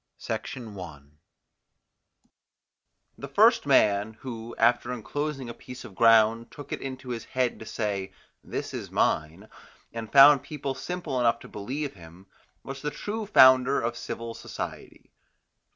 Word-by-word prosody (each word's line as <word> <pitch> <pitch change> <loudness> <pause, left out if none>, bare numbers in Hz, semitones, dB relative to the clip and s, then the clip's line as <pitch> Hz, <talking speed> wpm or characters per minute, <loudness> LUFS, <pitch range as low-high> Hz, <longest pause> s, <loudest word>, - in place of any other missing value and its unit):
SECOND 115 -5 -6
PART 80 -7 -9 2.2
The - - -6
first - - +4
man, 105 +1 +3
who, 120 -2 -7
after 120 +1 +2
enclosing 135 +3 -4
a 120 - -6
piece 125 +1 -11
of 115 - -11
ground, 115 +1 +4
took 145 -1 -9
it - - -5
into 130 -1 -7
his 115 -2 -4
head 125 -2 -1
to 110 - -10
say, 100 -3 -3 0.3
"This - - -5
is - - -6
mine," 80 +7 -1 0.5
and 115 -1 -6
found 140 0 +8
people 140 -1 -5
simple 170 -1 -4
enough 115 -1 +3
to - - -11
believe 135 +8 -5
him, 85 +1 -15 0.4
was 135 0 -7
the 150 - -2
true 210 +8 -5
founder 130 -6 +6
of 120 +1 -2
civil 115 -1 -6
society. - - -8
120 Hz, 140 wpm, -27 LUFS, 110-135 Hz, 2.2 s, found